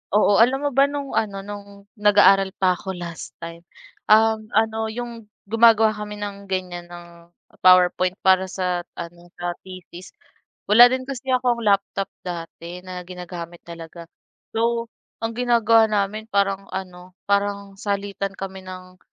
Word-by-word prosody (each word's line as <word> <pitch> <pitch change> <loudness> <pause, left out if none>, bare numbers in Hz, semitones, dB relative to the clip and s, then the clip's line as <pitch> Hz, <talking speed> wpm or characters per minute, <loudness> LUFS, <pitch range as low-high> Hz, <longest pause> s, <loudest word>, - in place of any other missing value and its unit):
Oo, 205 -1 +4
alam 265 +5 +4
mo 285 - 0
ba 275 +2 +4
nung 285 -1 -5
ano, 195 -2 -2
nung 200 0 -10 0.2
nag-aaral 200 -2 +5
pa 185 -1 +2
ako 190 -1 -5
last 170 -2 -8
time, 170 0 -7 0.5
um, 220 +1 +5 0.2
ano 220 0 +1
yung 230 -1 -7 0.2
gumagawa 225 0 +5
kami 210 -1 -7
ng 200 -1 -7
ganiyan 180 -2 -4
ng, 175 0 -11 0.6
PowerPoint 185 0 +5
para 190 0 +4
sa 180 -2 -2 0.2
ano, 170 +1 -9
sa 175 0 -3
thesis, 185 -1 -11 0.6
wala 230 +4 +9
din 255 0 -2
kasi 265 -1 -4
akong 245 -2 +1
laptop 200 -1 0
dati 175 0 -7
na 185 -1 -7
ginagamit 175 -1 -8
talaga. 170 0 -10 0.5
So, 230 +1 0 0.4
ang 225 - -1
ginagawa 230 -2 +4
namin 210 +1 -2
parang 195 -2 0
ano 180 -1 -8
parang 200 -1 -1
salitan 200 -1 -3
kami 190 -1 -8
ng 185 0 -10
200 Hz, 140 wpm, -22 LUFS, 185-220 Hz, 0.6 s, wala